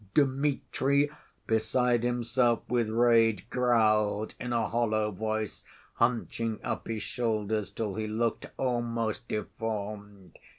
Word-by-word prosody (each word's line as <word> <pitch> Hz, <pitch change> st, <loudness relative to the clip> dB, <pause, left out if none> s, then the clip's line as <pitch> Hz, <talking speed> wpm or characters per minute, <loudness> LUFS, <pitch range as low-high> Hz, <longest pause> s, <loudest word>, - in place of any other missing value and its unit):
Dmitri, 140 Hz, 0 st, +2 dB, 0.3 s
beside 120 Hz, +2 st, +2 dB
himself 120 Hz, 0 st, +1 dB
with 120 Hz, -3 st, +1 dB
rage, 115 Hz, -1 st, +3 dB
growled 110 Hz, -4 st, +2 dB
in 125 Hz, -, -4 dB
a 115 Hz, -1 st, +1 dB
hollow 110 Hz, -2 st, +1 dB
voice, 110 Hz, +1 st, -3 dB, 0.3 s
hunching 115 Hz, -2 st, 0 dB
up -, -, -3 dB
his 110 Hz, -3 st, -3 dB
shoulders 110 Hz, -4 st, -1 dB
till 110 Hz, -3 st, -3 dB
he 110 Hz, +1 st, -3 dB
looked 115 Hz, +1 st, -1 dB
almost 120 Hz, -1 st, -1 dB
deformed. 105 Hz, -3 st, -5 dB
115 Hz, 110 wpm, -29 LUFS, 110-120 Hz, 0.3 s, rage